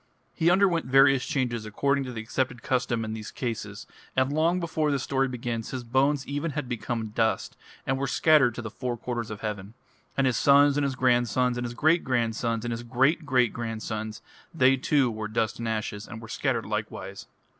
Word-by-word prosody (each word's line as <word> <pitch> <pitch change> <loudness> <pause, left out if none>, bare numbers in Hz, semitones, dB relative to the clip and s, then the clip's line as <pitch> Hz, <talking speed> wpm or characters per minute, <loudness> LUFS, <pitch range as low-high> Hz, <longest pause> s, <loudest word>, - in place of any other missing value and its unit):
He 165 - +2
underwent 180 -4 +3
various 135 0 +5
changes 120 -5 -1
according 140 +6 0
to 125 - -5
the 115 -2 -5
accepted 125 +1 -2
custom 120 -3 0
in 110 - -4
these 110 -1 -6
cases, 110 -4 -5 0.3
and 130 +2 +2
long 165 +4 +2
before 160 -3 -1
this 140 -2 0
story 135 -1 +1
begins 120 -3 -4
his 130 -2 -5
bones 135 +4 +1
even 145 +2 -3
had 145 -3 -3
become 115 -1 -3
dust, 110 +1 0 0.3
and 135 0 0
were 140 - -1
scattered 140 -8 +4
to 120 - -5
the 110 - -6
four 120 0 -4
quarters 120 -1 -4
of 110 -1 -7
heaven. 105 0 -5 0.4
And 135 - +3
his 125 -3 +2
sons 140 0 +5
and 145 - +1
his 135 -2 -1
grandsons 125 0 +2
and 120 0 -3
his 120 0 -5
great 160 +6 +3
grandsons 115 -2 -1
and 120 - -2
his 115 0 -3
great 135 +7 +1
great 125 -3 +3
grandsons, 110 -2 -5 0.3
they 135 -4 +4
too 135 -1 +2
were 110 -1 -4
dust 110 +1 -1
and 115 - -3
ashes, 110 -2 -3
and 110 - -8
were 115 - -10
scattered - - -1
likewise. - - -5
125 Hz, 200 wpm, -27 LUFS, 115-140 Hz, 0.4 s, various